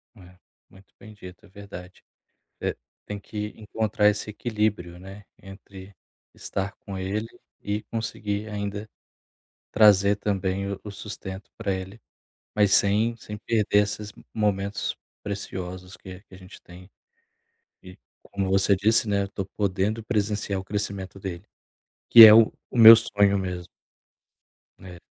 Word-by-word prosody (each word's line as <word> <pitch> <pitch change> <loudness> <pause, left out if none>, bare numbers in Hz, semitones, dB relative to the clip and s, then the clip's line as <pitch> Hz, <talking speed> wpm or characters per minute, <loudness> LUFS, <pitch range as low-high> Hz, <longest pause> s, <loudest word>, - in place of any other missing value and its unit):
É. 90 -3 -17 0.3
Muito 95 +1 -21
bem 110 -2 -13
dito, 90 -2 -13
é 100 - -20
verdade. 95 -2 -12 0.6
Eh, - - -2 0.3
tem 105 - -6
que 105 +1 -6
encontrar 105 -1 0
esse 105 +1 -2
equilíbrio, 105 -6 -2
né, 95 +2 -12 0.2
entre 95 0 -13 0.4
estar 100 +1 -4
com 100 -2 -8
ele 100 +4 -3 0.3
e 105 +1 -3
conseguir 110 -2 -4
ainda 105 0 -5 0.8
trazer 100 -2 +5
também 100 -1 -2
o 100 - -5
o 105 - -8
sustento 100 -1 -9
pra 100 -4 -2
ele, 95 +4 -7 0.6
mas 105 -2 +3
sem 110 +4 +2
sem 105 -1 -9
perder 105 -2 +1
essas 105 0 -4
m - - -19
momentos 100 -2 -1 0.3
preciosos 95 -2 -6
que 95 0 -11
que 95 - -17
a - - -13
gente 95 +1 -14
tem. 90 +2 -15 0.9
E, 90 -1 -13 0.3
como 95 -1 -4
você 95 +1 +3
disse, 110 +4 +2
né, 100 -1 +1
eu - - -4
tô 100 -1 -5
podendo 100 +3 -2
presenciar 105 -3 -2
o - - -7
crescimento 100 -2 -5
dele, 95 -1 -7 0.6
que 115 -1 +11
é 110 - +9
o 115 -1 +6 0.2
meu 115 -2 +10
sonho 100 -2 +1
mesmo. 90 -2 -5 1.1
É. 90 -2 -12
100 Hz, 140 wpm, -25 LUFS, 95-105 Hz, 1.1 s, que